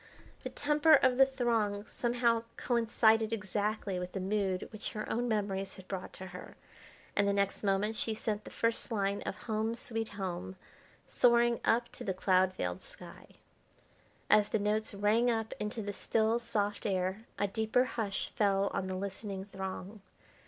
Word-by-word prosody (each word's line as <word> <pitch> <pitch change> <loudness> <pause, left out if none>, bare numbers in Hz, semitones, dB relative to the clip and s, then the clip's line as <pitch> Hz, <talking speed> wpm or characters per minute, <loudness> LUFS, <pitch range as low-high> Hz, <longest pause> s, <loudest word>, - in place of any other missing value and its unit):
The - - -4
temper 300 +2 +4
of 255 -2 +3
the 270 - +8
throng 225 -6 0
somehow 235 -1 +1 0.2
coincided 225 -2 +3
exactly 210 -2 -1
with 180 0 -5
the 195 - -2
mood 190 -1 -1
which 215 -1 -5
her 215 - -4
own 245 +2 -1
memories 200 -3 -1
had 185 -1 -13
brought 190 -2 -5
to 190 - -8
her, 180 0 -10 0.6
and 200 0 +3
the 200 - +2
next 200 +1 0
moment 205 +2 +1
she 220 0 -1
sent 215 -1 -2
the - - -9
first 230 0 0
line 200 -2 0
of - - -5
"Home, 220 0 -1
Sweet 225 -2 -3
Home" 185 -2 -5 0.5
soaring 240 -1 +4
up 235 +1 +2
to - - -9
the 190 -5 -2
cloud 185 0 +3
veiled - - -3
sky. - - -12 1.0
As 210 -1 +5
the - - +1
notes 210 +1 0
rang 215 +4 +3
up 225 -2 -1
into 210 +1 -3
the 205 0 -4
still, 220 +3 +1
soft 210 -3 -1
air 190 +2 -1
a 205 - +1
deeper 220 +4 +2
hush 220 -6 -2
fell 200 -1 +2
on 190 -1 -1
the 185 - -3
listening 195 0 -4
throng. 195 +1 -6
210 Hz, 165 wpm, -32 LUFS, 195-230 Hz, 1.0 s, the